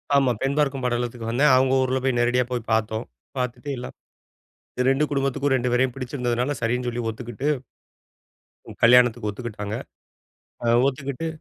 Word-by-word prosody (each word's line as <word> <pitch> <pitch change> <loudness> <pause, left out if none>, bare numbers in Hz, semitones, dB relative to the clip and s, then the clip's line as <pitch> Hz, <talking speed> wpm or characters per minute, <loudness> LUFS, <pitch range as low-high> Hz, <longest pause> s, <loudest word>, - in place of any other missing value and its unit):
ஆமா. 135 -3 +4
பெண் 135 +1 0
பார்க்கும் 140 -3 +1
படலத்துக்கு 120 -1 -2
வந்தேன். 135 +3 +4
அவங்க 130 0 +3
ஊர்ல 130 0 0
போய் 130 -2 +1
நேரடியா 120 +1 +2
போய் 120 -2 -3
பாத்தோம். 110 0 0 0.3
பாத்துட்டு 125 +3 -3
எல்லாம் 125 - -7 1.0
2 140 +3 +2
குடும்பத்துக்கும், 135 0 0
2 125 0 0
பேரையும் 130 0 +2
பிடிச்சிருந்ததனால 125 0 -2
சரின்னு 125 +2 0
சொல்லி 120 0 -2
ஒத்துக்கிட்டு 120 +4 -4 1.2
ம், - - -11
கல்யாணத்துக்கு 120 -2 +5
ஒத்துக்கிட்டாங்க. 105 -1 -5 0.9
அ - - -2 0.2
ஒத்துக்கிட்டு 140 +3 -3
125 Hz, 135 wpm, -24 LUFS, 120-135 Hz, 1.2 s, கல்யாணத்துக்கு